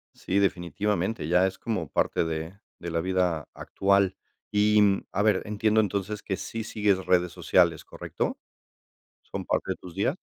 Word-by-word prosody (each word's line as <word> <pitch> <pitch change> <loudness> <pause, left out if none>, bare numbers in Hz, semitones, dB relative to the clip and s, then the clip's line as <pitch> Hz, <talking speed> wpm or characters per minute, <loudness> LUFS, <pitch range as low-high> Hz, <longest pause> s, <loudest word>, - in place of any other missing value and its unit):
Sí, 95 - -2
definitivamente, 95 0 0
ya 90 +2 +4
es 95 0 -6
como 110 -9 -3
parte - - +1
de 80 +4 -4 0.2
de 85 -1 -5
la 85 - 0
vida 90 -4 0
actual. 100 -1 +1 0.4
Y, 105 +1 +4
mm, 100 -1 +3
a 100 - +1
ver, 105 -3 +3
entiendo, 105 +1 +1
entonces, 100 +1 -2
que 95 - -2
sí 115 -1 -5
sigues 100 -4 +1
redes 90 -1 +2
sociales, 85 -2 +2
¿correcto? - - -4 0.9
¿Son - - -6
parte - - -1
de - - -7
tus 90 -2 -12
días? 115 - 0
95 Hz, 165 wpm, -27 LUFS, 90-105 Hz, 0.9 s, ya